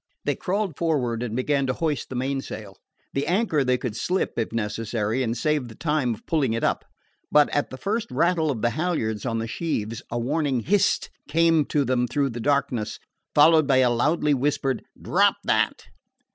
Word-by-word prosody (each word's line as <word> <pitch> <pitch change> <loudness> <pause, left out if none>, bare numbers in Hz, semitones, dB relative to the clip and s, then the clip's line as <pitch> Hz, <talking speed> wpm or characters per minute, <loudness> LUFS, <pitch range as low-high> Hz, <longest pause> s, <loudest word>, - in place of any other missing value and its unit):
They - - +2
crawled 195 -4 -2
forward 130 -9 0
and 120 -2 -3
began 140 +2 +1
to 130 - +1
hoist 155 -1 -2
the 130 - -6
mainsail. 125 -6 -4 0.4
The 140 +2 -1
anchor 175 -5 +2
they 125 -1 +2
could 120 -4 -4
slip, 185 +9 -1
if 115 - -2
necessary, 110 +1 -2
and 120 -1 -1
save 150 +1 0
the 110 - -11
time 150 -7 0
of 105 - -20
pulling 140 -8 +1
it 115 - -2
up. - - +1 0.5
But 150 -1 +5
at 145 - 0
the 130 - -8
first 210 - -2
rattle 160 +4 +1
of 120 -6 -3
the 120 - +3
halyards 130 - -1
on 115 -2 -1
the 115 0 -2
sheaves 115 -6 -3
a 120 - -3
warning 135 +1 0
"Hist!" 200 - +1 0.2
came 165 0 +3
to 145 -2 0
them 125 -1 +1
through 140 +1 0
the 120 - -6
darkness, 120 -5 0 0.4
followed 155 0 +6
by 135 -2 +4
a 125 -2 +4
loudly 150 +4 +2
whispered 135 0 0 0.2
"Drop - - +3
that!" - - +1
135 Hz, 185 wpm, -24 LUFS, 120-155 Hz, 0.5 s, followed